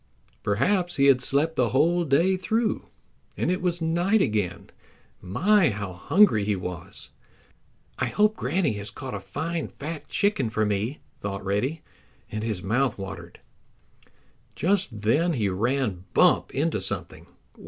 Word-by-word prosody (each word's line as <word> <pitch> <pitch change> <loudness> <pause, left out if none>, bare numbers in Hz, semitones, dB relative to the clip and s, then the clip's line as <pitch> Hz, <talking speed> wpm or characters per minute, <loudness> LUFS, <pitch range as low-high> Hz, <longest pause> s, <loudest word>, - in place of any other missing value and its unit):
Perhaps 175 - +1
he 140 - +3
had 135 -2 +5
slept 150 +5 +2
the 125 -4 +2
whole 170 +7 +3
day 165 +7 +3
through, 220 +5 -1 0.5
and - - 0
it 185 - -1
was 175 -2 0
night 175 +6 +2
again. 105 - -1 0.5
My, 180 - +3
how 100 -3 -4
hungry 110 - +4
he 105 0 0
was! 90 -2 -7 0.9
"I - - +1
hope 210 +1 +2
Granny 160 - 0
has 100 - -6
caught 130 -2 -7
a 100 - -3
fine, 160 - -4
fat 155 +2 -7
chicken 200 - +1
for 110 -1 0
me," 105 +7 -2 0.2
thought 100 -1 -5
Reddy, 125 +11 -1 0.5
and 110 0 -3
his 110 -6 -3
mouth 120 +4 +1
watered. 95 -1 -8 1.1
Just 180 - 0
then 155 +11 +2
he 110 -8 0
ran 105 -1 -1
bump - - +4
into - - 0
something. - - -4
135 Hz, 145 wpm, -25 LUFS, 105-175 Hz, 1.1 s, had